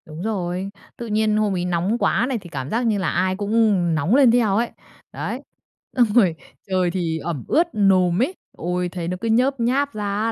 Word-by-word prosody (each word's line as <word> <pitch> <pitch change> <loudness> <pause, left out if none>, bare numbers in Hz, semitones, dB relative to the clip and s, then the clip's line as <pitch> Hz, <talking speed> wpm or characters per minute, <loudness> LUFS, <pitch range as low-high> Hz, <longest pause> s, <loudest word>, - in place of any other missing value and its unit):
Đúng 155 +1 -9
rồi, 190 -3 -2 0.3
tự 235 - -6
nhiên 215 0 +1
hôm 210 -2 +1
ấy 175 -1 -1
nóng 180 +5 0
quá 240 - +1
này, 260 - -1
thì 175 - -12
cảm 135 -4 -5
giác 235 +2 0
như 215 -2 +2
là 190 -3 0
ai 185 0 0
cũng, 205 +1 -4
ừm, 200 -7 +3
nóng 160 - +2
lên 270 -4 +6
theo 225 -5 +2
ấy. 235 +1 0 0.4
Đấy. - - -4 0.6
Xong 245 - +6
rồi 190 -9 +4 0.3
trời 185 -2 +1
thì 170 -3 -2
ẩm 160 -7 -4
ướt, 340 +2 +3
nồm 185 -2 +3
ấy, 355 +9 0 0.2
ôi, 180 +1 -2
thấy 175 -1 -5
nó 180 +1 -3
cứ 230 - -2
nhớp 255 +4 +2
nháp 265 +4 +1
ra 210 -1 -4 0.2
á 230 - +1
195 Hz, 220 wpm, -22 LUFS, 175-230 Hz, 0.6 s, lên